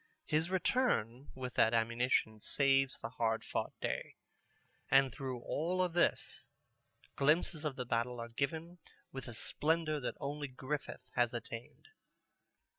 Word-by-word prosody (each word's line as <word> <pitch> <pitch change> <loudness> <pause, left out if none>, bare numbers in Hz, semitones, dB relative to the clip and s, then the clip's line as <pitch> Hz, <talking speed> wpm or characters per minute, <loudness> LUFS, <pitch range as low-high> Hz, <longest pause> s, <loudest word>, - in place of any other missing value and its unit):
His 160 +2 +1
return 145 - +1
with 130 -1 -5
that 115 +1 +4
ammunition 115 -1 +2
saves 135 0 +3
the 115 - -2
hard 115 -2 0
fought - - -2
day. - - -2 0.7
And 135 -1 +6
through 130 -2 -4
all 180 +8 +1
this, 175 +1 +1 0.7
glimpses 155 +2 +2
of 145 -3 -1
the 125 - -3
battle 120 +1 0
are 115 0 -5
given 160 +8 -3 0.3
with 135 -1 -6
a 120 - -6
splendor 155 +4 0
that 125 - -3
only 145 0 -3
Griffith 135 +2 -4
has 120 0 +2
attained. 120 - -7
135 Hz, 130 wpm, -35 LUFS, 120-155 Hz, 0.7 s, And